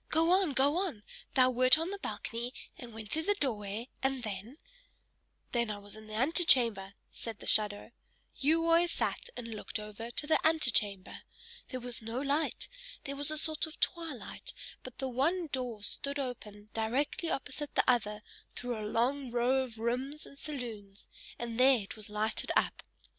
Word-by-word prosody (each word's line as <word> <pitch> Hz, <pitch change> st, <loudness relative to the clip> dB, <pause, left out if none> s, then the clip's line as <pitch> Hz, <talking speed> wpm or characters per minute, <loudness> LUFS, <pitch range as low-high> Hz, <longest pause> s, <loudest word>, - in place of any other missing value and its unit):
Go 325 Hz, +2 st, +3 dB
on, 370 Hz, -5 st, +4 dB
go 280 Hz, +4 st, +4 dB
on 345 Hz, -, -2 dB, 0.3 s
thou 255 Hz, -1 st, +6 dB
wert 255 Hz, +3 st, +7 dB
on 330 Hz, +4 st, -2 dB
the 400 Hz, -, -4 dB
balcony, 240 Hz, -7 st, -4 dB, 0.2 s
and 240 Hz, -2 st, -10 dB
went 220 Hz, -1 st, -8 dB
through 315 Hz, -, +2 dB
the 410 Hz, +5 st, +2 dB
doorway, 220 Hz, -, -2 dB
and 265 Hz, -1 st, 0 dB
then 215 Hz, +5 st, -5 dB, 0.5 s
" -, -, -43 dB
"Then 235 Hz, -2 st, +1 dB
I 210 Hz, -, -2 dB
was 205 Hz, 0 st, -8 dB
in 215 Hz, 0 st, -11 dB
the 215 Hz, -, -6 dB
antechamber," 235 Hz, -, +4 dB, 0.2 s
said 225 Hz, -3 st, -4 dB
the -, -, -11 dB
shadow. 210 Hz, +1 st, +3 dB, 0.4 s
"You 320 Hz, +4 st, +3 dB
always 335 Hz, +1 st, +5 dB
sat -, -, -1 dB
and 230 Hz, -1 st, -5 dB
looked 220 Hz, 0 st, -4 dB
over 210 Hz, +2 st, -7 dB
to 240 Hz, -, -1 dB
the 315 Hz, -, +3 dB
antechamber. 230 Hz, -12 st, +2 dB, 0.5 s
There 255 Hz, -, -4 dB
was 245 Hz, -1 st, -6 dB
no 225 Hz, +3 st, -3 dB
light; 285 Hz, +3 st, 0 dB, 0.4 s
there 280 Hz, -1 st, -4 dB
was 285 Hz, +1 st, +3 dB
a 310 Hz, -, +1 dB
sort 310 Hz, 0 st, +2 dB
of 315 Hz, -, -12 dB
twilight, 330 Hz, -7 st, -3 dB, 0.3 s
but 255 Hz, -, -10 dB
the 265 Hz, -, -2 dB
one 305 Hz, +8 st, +1 dB
door 245 Hz, -5 st, -3 dB
stood 280 Hz, +7 st, -3 dB
open 215 Hz, -6 st, -5 dB
directly 255 Hz, +9 st, 0 dB
opposite 285 Hz, +1 st, -3 dB
the -, -, +3 dB
other 210 Hz, -4 st, +2 dB, 0.3 s
through 245 Hz, -2 st, -3 dB
a -, -, -4 dB
long 260 Hz, +4 st, +1 dB
row 245 Hz, +3 st, +2 dB
of 235 Hz, -3 st, -9 dB
rooms 255 Hz, +6 st, -2 dB
and 275 Hz, -, -14 dB
saloons, 225 Hz, -9 st, -6 dB, 0.3 s
and 235 Hz, 0 st, -4 dB
there 260 Hz, 0 st, +7 dB
it 195 Hz, -, -8 dB
was 215 Hz, -2 st, -8 dB
lighted 215 Hz, +1 st, -1 dB
up. -, -, +2 dB
250 Hz, 180 wpm, -32 LUFS, 220-290 Hz, 0.5 s, wert